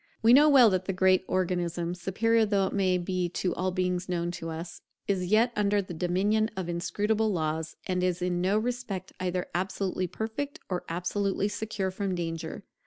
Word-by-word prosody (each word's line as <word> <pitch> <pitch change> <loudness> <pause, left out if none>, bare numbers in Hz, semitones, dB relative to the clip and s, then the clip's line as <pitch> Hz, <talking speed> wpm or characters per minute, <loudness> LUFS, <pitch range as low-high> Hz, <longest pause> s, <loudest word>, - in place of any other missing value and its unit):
We 230 +2 +7
know 295 +3 +7
well 255 -6 +7
that 185 0 0
the 195 - -1
great 185 0 +3
Organism, 175 -2 -1
superior 220 +6 +1
though 200 -3 +1
it 185 -3 +1
be 185 -1 -1
to 180 0 -1
all 185 +1 -1
beings 180 0 -1
known 175 -1 -1
to 165 -1 -6
us, 165 +1 -7 0.3
is 185 -3 0
yet 220 +5 +4
under 205 0 +2
the 185 -3 -4
dominion 195 +6 +1
of 185 -2 -3
inscrutable 210 +5 0
laws, 160 -2 -2
and 180 -1 -1
is 180 -1 +1
in 180 -1 -1
no 190 +3 +2
respect 220 -5 -3
either 180 0 -1
absolutely 185 0 -1
perfect 225 +10 -4
or 180 -2 -2
absolutely 195 +4 -1
secure 205 -2 -3
from 190 -1 -2
danger. 165 -2 -4
185 Hz, 175 wpm, -28 LUFS, 175-205 Hz, 0.3 s, We